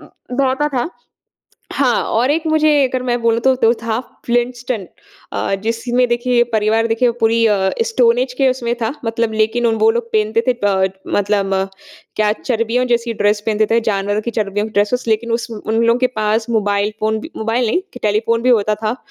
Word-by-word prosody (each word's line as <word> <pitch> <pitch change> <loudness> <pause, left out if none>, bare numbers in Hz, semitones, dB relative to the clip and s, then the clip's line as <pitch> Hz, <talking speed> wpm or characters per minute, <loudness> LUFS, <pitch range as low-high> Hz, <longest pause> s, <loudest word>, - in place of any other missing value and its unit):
अ, - - -14 0.3
दौड़ता 275 +2 +1
था। 265 +2 -2 0.8
हाँ, 255 -4 +1
और 245 +5 +1
एक 315 +2 +1
मुझे 310 0 +3 0.2
अगर 255 0 -3
मैं 245 -1 -1
बोलूँ 230 0 +2
तो, 265 +2 +3
तो 230 -2 +3
था 230 0 -1 0.3
फ्लिंटस्टन 240 -3 -1 0.5
अ, 195 - -1
जिसमें 240 +2 0
देखिए 240 0 +2
परिवार 220 +1 +2
देखिए 235 +2 +2
पूरी 225 +1 +3
अ, 195 -3 +2
स्टोन 245 - +3
एज 255 0 -1
के 270 -2 +4
उसमें 240 -2 -2
था 225 - 0
मतलब 225 0 -1
लेकिन 220 +2 +1
उन 225 - +1
वो 220 +1 +5
लोग 235 +1 0
पहनते 215 +1 +2
थे 255 - +4
टड 190 -1 +2 0.2
मतलब 200 -1 +1 0.7
क्या 210 -1 +2
चर्बियों 230 +1 -1
जैसी 235 -1 0
ड्रेस 205 0 +1
पहनते 215 -1 +2
थे, 230 +1 +3
जानवरों 205 -1 -1
की 235 - -3
चर्बियों 210 -1 -2
की 220 - -11
ड्रेसेज़। 210 +5 +1
लेकिन 225 +2 0
उस 230 +1 -2
उन 220 0 -4
लोगों 230 +1 +3
के 255 - +3
पास 215 +1 0
मोबाइल 205 -2 +1
फ़ोन 220 0 0
भी 320 - -9
मोबाइल 225 +2 0
नहीं, 295 +12 +1
कि 250 - -9
टेलीफ़ोन 220 +2 +1
भी 255 - +3
होता 215 -3 +3
था 215 +3 0
230 Hz, 195 wpm, -17 LUFS, 215-245 Hz, 0.8 s, वो